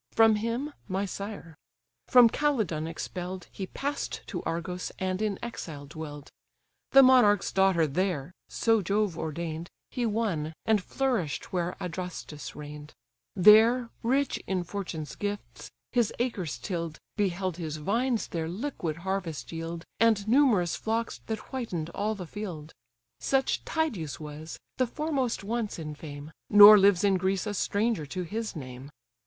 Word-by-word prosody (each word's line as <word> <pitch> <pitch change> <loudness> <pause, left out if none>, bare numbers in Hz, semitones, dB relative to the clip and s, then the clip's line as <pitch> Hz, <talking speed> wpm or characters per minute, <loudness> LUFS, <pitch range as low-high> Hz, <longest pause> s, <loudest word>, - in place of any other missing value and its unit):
From 225 -1 +6
him, 235 +7 -2
my 195 +1 -1
sire. 200 -3 -6 0.5
From 245 -2 +8
Calydon 220 - 0
expell'd, 180 +2 -5
He 190 - -5
pass'd 285 +7 -3
to - - -3
Argos, 180 +2 -3
and 185 +1 -2
in 210 -3 0
exile 160 -11 -6
dwell'd; 145 -1 -8 0.6
The 270 - +8
monarch's 245 -6 +5
daughter 190 -4 +3
there 165 0 -1 0.2
(so 225 -2 +2
Jove 200 -1 0
ordain'd) 165 +1 -4 0.2
He 245 -2 -1
won, 200 -9 -1
and 220 -3 +3
flourish'd 235 - -1
where 175 -1 -1
Adrastus 180 -4 -6
reign'd; 150 0 -9 0.4
There, 225 +5 +6
rich 270 +4 +1
in 185 -2 0
fortune's 175 -4 -5
gifts, 205 0 -5 0.2
his 240 -4 +2
acres 210 - -2
till'd, 170 -4 -4 0.2
Beheld 185 -3 -1
his 155 -3 -4
vines 230 - 0
their 165 -1 -3
liquid 180 - -3
harvest 190 -5 -3
yield, 165 +1 -5
And 220 -3 +3
numerous 225 - +4
flocks 225 +1 -2
that 220 -1 -5
whiten'd 180 -11 -3
all 210 +4 -1
the 185 -3 -6
field. 165 -5 -7 0.5
Such 270 -1 +1
Tydeus 225 - -2
was, 155 +1 -8 0.2
the 255 - +2
foremost 275 -5 -1
once 220 +1 -2
in 155 -2 -5
fame! 145 0 -9 0.2
Nor 205 +1 +11
lives 195 -2 +5
in 195 -2 +4
Greece 190 +2 0
a 210 - -2
stranger 205 -4 0
to 185 +5 -4
his 215 +5 -4
name. 130 -2 -8
190 Hz, 140 wpm, -28 LUFS, 165-225 Hz, 0.6 s, Nor